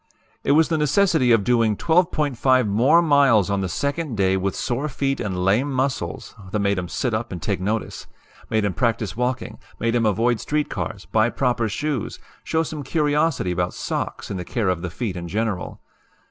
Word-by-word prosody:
"It 140 Hz, -, +3 dB
was 160 Hz, +1 st, +4 dB
the 160 Hz, -2 st, +1 dB
necessity 150 Hz, -3 st, +3 dB
of 115 Hz, -3 st, +4 dB
doing 115 Hz, -2 st, +2 dB
12.5 145 Hz, -8 st, +2 dB
MORE 130 Hz, +12 st, +4 dB
MILES 135 Hz, -, +4 dB
ON 100 Hz, -1 st, 0 dB
THE 95 Hz, -, -2 dB
SECOND 140 Hz, -, -2 dB
DAY 95 Hz, -1 st, +2 dB
WITH 95 Hz, +1 st, -1 dB
SORE 130 Hz, +5 st, -2 dB
FEET 135 Hz, 0 st, -1 dB
AND 90 Hz, -3 st, -2 dB
LAME 120 Hz, +9 st, +2 dB
MUSCLES 130 Hz, 0 st, -2 dB, 0.2 s
that 105 Hz, -, -1 dB
made 100 Hz, -2 st, +1 dB
'em 90 Hz, -, -4 dB
sit 120 Hz, +7 st, -2 dB
up 115 Hz, +2 st, -2 dB
and 90 Hz, -, -5 dB
take 95 Hz, -1 st, -2 dB
notice 105 Hz, +3 st, -3 dB, 0.4 s
made 110 Hz, -1 st, +1 dB
'em 100 Hz, -, 0 dB
practice 115 Hz, -3 st, -1 dB
walking, 125 Hz, -2 st, -2 dB, 0.2 s
made 115 Hz, 0 st, 0 dB
'em 115 Hz, -2 st, +2 dB
avoid 115 Hz, +3 st, +1 dB
street 150 Hz, 0 st, -1 dB
cars, 100 Hz, -, -4 dB
buy 110 Hz, +1 st, +2 dB
proper 120 Hz, -3 st, 0 dB
shoes, 140 Hz, +2 st, -3 dB, 0.3 s
show 160 Hz, 0 st, 0 dB
some 155 Hz, -2 st, -5 dB
curiosity 150 Hz, -, +1 dB
about 90 Hz, 0 st, -1 dB
sox -, -, -4 dB
and 95 Hz, -, -3 dB
the -, -, -4 dB
care 110 Hz, +1 st, -1 dB
of 90 Hz, -2 st, -1 dB
the 90 Hz, -, -3 dB
feet 100 Hz, +2 st, -4 dB
in 85 Hz, -1 st, -5 dB
general. 100 Hz, -2 st, -3 dB
115 Hz, 190 wpm, -22 LUFS, 100-140 Hz, 0.4 s, was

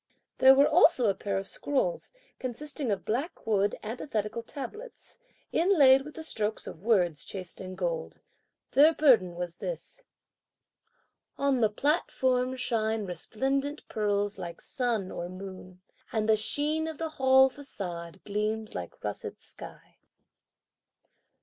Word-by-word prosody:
There 265 Hz, 0 st, +8 dB
was 280 Hz, +1 st, +6 dB
also 310 Hz, -6 st, +5 dB
a 200 Hz, -, +3 dB
pair 195 Hz, 0 st, -3 dB
of 195 Hz, -, -3 dB
scrolls 385 Hz, -, -1 dB, 0.3 s
consisting 265 Hz, +1 st, -4 dB
of 200 Hz, -, -2 dB
black 270 Hz, +10 st, -3 dB
wood 205 Hz, -2 st, +1 dB
antithetical 220 Hz, -1 st, -3 dB
tablets, 295 Hz, -, -9 dB, 0.3 s
inlaid 295 Hz, -7 st, +6 dB
with 300 Hz, +2 st, -10 dB
the 320 Hz, -, -7 dB
strokes 220 Hz, -8 st, -3 dB
of 160 Hz, -, -9 dB
words 180 Hz, -8 st, +2 dB
in -, -, -13 dB
chased 185 Hz, -2 st, -7 dB
gold. 170 Hz, -3 st, -3 dB, 0.5 s
Their 305 Hz, +3 st, +6 dB
burden 225 Hz, -, +4 dB
was 175 Hz, -1 st, -5 dB
this: -, -, -7 dB, 1.3 s
On 275 Hz, -3 st, +1 dB
the 220 Hz, -, +4 dB
platform 260 Hz, -1 st, +1 dB
shine 220 Hz, -4 st, -1 dB
resplendent 270 Hz, -, -2 dB
pearls 205 Hz, -1 st, 0 dB
like 170 Hz, -1 st, -6 dB
sun 230 Hz, -7 st, -2 dB
or 175 Hz, 0 st, -5 dB
moon, 185 Hz, -1 st, -9 dB, 0.3 s
And 220 Hz, -2 st, 0 dB
the 220 Hz, -, +5 dB
sheen 300 Hz, +8 st, -1 dB
of 320 Hz, -2 st, -5 dB
the 325 Hz, -1 st, -3 dB
Hall 265 Hz, -2 st, +5 dB
façade 185 Hz, -, -7 dB
gleams 215 Hz, +1 st, -2 dB
like 90 Hz, -1 st, -7 dB
russet -, -, -5 dB
sky. -, -, -13 dB
225 Hz, 130 wpm, -29 LUFS, 195-280 Hz, 1.3 s, There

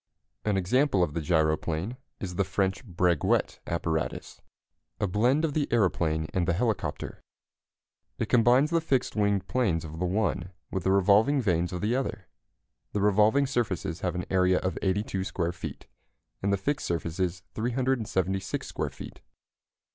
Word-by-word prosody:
An 105 Hz, -2 st, +2 dB
example 100 Hz, +2 st, +2 dB
of 75 Hz, -, -1 dB
the 85 Hz, -, -2 dB
gyroplane 80 Hz, +5 st, 0 dB, 0.2 s
is 90 Hz, -2 st, -4 dB
the 100 Hz, -, +1 dB
French 95 Hz, +3 st, -1 dB
Breguet 90 Hz, -, +1 dB
apparatus, 80 Hz, -2 st, -2 dB, 0.6 s
a -, -, +1 dB
blend 120 Hz, -, +2 dB
of 150 Hz, -, -2 dB
the 145 Hz, -1 st, 0 dB
aeroplane 85 Hz, -8 st, +1 dB
and 90 Hz, -2 st, 0 dB
the 85 Hz, -, +3 dB
helicopter. 100 Hz, -6 st, -2 dB, 1.0 s
It -, -, 0 dB
combines 125 Hz, +5 st, +4 dB
the 165 Hz, -1 st, +2 dB
fixed 135 Hz, -6 st, 0 dB
wing 100 Hz, -2 st, +2 dB
planes 95 Hz, -5 st, 0 dB
of 80 Hz, +1 st, -8 dB
the 90 Hz, -, 0 dB
one 95 Hz, -2 st, -1 dB, 0.2 s
with 95 Hz, -2 st, -3 dB
the 95 Hz, -, +3 dB
revolving 105 Hz, +8 st, +4 dB
vanes 90 Hz, -7 st, +1 dB
of 90 Hz, -, -4 dB
the 110 Hz, +4 st, +1 dB
other. 110 Hz, -8 st, -3 dB, 0.7 s
The 105 Hz, -, 0 dB
revolving 105 Hz, +7 st, +4 dB
surfaces 100 Hz, -, -2 dB
have 90 Hz, -2 st, -2 dB
an 90 Hz, -, -3 dB
area 90 Hz, -1 st, +4 dB
of 90 Hz, -2 st, -1 dB
82 95 Hz, 0 st, 0 dB
square 85 Hz, -3 st, -1 dB
feet, 85 Hz, -, -8 dB, 0.6 s
and 100 Hz, -, +1 dB
the 100 Hz, -, +2 dB
fixed 140 Hz, +9 st, -2 dB
surfaces 85 Hz, +2 st, -2 dB
376 110 Hz, -6 st, -1 dB
square -, -, -3 dB
feet. -, -, -11 dB
95 Hz, 155 wpm, -28 LUFS, 90-115 Hz, 1.0 s, combines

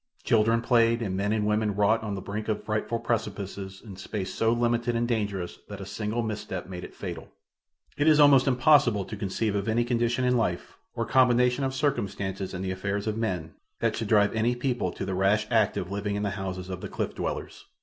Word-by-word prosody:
Children 115 Hz, 0 st, +3 dB
played 115 Hz, -1 st, +3 dB
and 95 Hz, -4 st, -2 dB
men 100 Hz, +2 st, 0 dB
and 110 Hz, -1 st, +1 dB
women 105 Hz, -1 st, +1 dB
wrought 105 Hz, +2 st, +3 dB
on 105 Hz, -2 st, -3 dB
the 95 Hz, -, -6 dB
brink 105 Hz, +1 st, -4 dB
of 110 Hz, -, -1 dB
frightful 110 Hz, +2 st, -1 dB
precipices 100 Hz, -4 st, -4 dB
in 105 Hz, -, -9 dB
a -, -, -12 dB
space 95 Hz, -1 st, -4 dB
so 115 Hz, 0 st, +2 dB
limited 120 Hz, 0 st, +1 dB
and 120 Hz, +1 st, +1 dB
dangerous 100 Hz, -6 st, -2 dB
that 100 Hz, -1 st, -7 dB
a 100 Hz, -, -6 dB
single 110 Hz, +4 st, -2 dB
misstep 105 Hz, -4 st, -4 dB
made 90 Hz, -1 st, -7 dB
it -, -, -10 dB
fatal. -, -, -6 dB, 0.7 s
It 145 Hz, +2 st, +2 dB
is 155 Hz, -1 st, +6 dB
almost 145 Hz, -2 st, +6 dB
impossible 125 Hz, -6 st, +4 dB
to 110 Hz, -, -6 dB
conceive 105 Hz, +1 st, -1 dB
of 100 Hz, +1 st, -2 dB
any 115 Hz, +2 st, +2 dB
condition 120 Hz, +1 st, +1 dB
in 125 Hz, 0 st, +3 dB
life, 90 Hz, -7 st, -2 dB, 0.2 s
or -, -, -1 dB
combination 125 Hz, 0 st, +3 dB
of 135 Hz, 0 st, -1 dB
circumstances 100 Hz, -9 st, -2 dB
in 90 Hz, -, -4 dB
the 95 Hz, -, -2 dB
affairs 100 Hz, +2 st, -2 dB
of 110 Hz, -1 st, -1 dB
men, 90 Hz, -8 st, -2 dB, 0.3 s
that -, -, +1 dB
should 115 Hz, -, -3 dB
drive 105 Hz, -1 st, +4 dB
any 115 Hz, +2 st, +1 dB
people 120 Hz, -7 st, -1 dB
to -, -, -5 dB
the 95 Hz, -, -3 dB
rash 100 Hz, +3 st, +2 dB
act 110 Hz, -4 st, +3 dB
of 90 Hz, -, -4 dB
living 100 Hz, 0 st, -2 dB
in 105 Hz, -, -2 dB
the 100 Hz, -, -1 dB
houses 95 Hz, -1 st, -5 dB
of 90 Hz, 0 st, -5 dB
the -, -, -6 dB
cliff -, -, -3 dB
dwellers. -, -, -5 dB
110 Hz, 220 wpm, -27 LUFS, 100-120 Hz, 0.7 s, is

